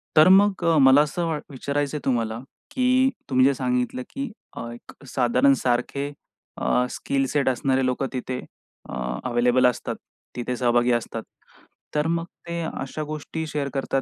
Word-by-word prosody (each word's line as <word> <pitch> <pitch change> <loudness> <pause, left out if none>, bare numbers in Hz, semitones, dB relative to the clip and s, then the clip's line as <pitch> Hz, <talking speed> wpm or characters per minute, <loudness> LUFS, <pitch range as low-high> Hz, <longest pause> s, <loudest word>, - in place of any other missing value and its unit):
तर 155 +3 +8
मग 195 -1 +5
अ, 165 -2 +4
मला 135 +1 +7
असं 160 +3 -1
वा 160 -2 -1
विचारायचं 140 +2 -2
आहे - - -10
तुम्हाला, 115 -3 0 0.3
की 255 0 +3 0.2
तुम्ही 130 -1 +4
जे 140 - +4
सांगितलं, 125 -1 -1
की 275 -3 -5 0.3
अ, - - -4
एक 120 +3 -14
साधारण 130 +2 +3
सारखे 130 +3 0 0.5
अ, 125 - +2
स्किल 135 -1 -1
सेट 140 -3 +2
असणारे 130 +1 +1
लोक 130 +1 0
तिथे 130 0 -3 0.5
अ, - - -6 0.4
अवेलेबल 125 +1 +3
असतात, 125 - -2 0.4
तिथे 125 +1 -2
सहभागी 120 0 +3
असतात. 120 -1 -1 0.7
तर 150 +1 +2
मग 165 0 0 0.2
ते 170 0 -3
अशा 155 -1 -4
गोष्टी 155 +1 -5
शेअर 145 -2 -2
करतात 135 -1 0
135 Hz, 160 wpm, -24 LUFS, 125-155 Hz, 0.7 s, तर